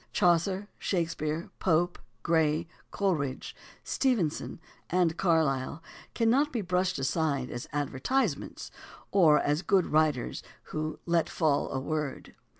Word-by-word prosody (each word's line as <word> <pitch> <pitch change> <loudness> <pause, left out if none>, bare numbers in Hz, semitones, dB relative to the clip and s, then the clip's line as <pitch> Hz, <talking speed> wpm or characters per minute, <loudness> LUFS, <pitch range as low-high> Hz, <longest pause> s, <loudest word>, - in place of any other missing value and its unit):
Chaucer, 185 +3 +2
Shakespeare, 165 -3 -2
Pope, 175 0 +1 0.2
Gray, 160 -1 +2 0.2
Cole 195 +5 +1
ridge, 140 -3 -4 0.3
Stevenson, 210 - 0 0.3
and 175 -2 +2
Carlyle 160 -4 +1 0.3
cannot 255 +6 +3
be 235 - -1
brushed 180 0 0
aside 140 -1 0
as 120 - -6
"advertisements" 145 - -1 0.4
or 165 -6 +6
as 145 +3 +1
good 190 -2 +3
writers 150 -5 +1 0.3
who 155 0 -2
"let 170 -1 +1
fall 155 -4 +1
a 135 - -1
word." 150 0 -4
165 Hz, 115 wpm, -29 LUFS, 150-185 Hz, 0.4 s, or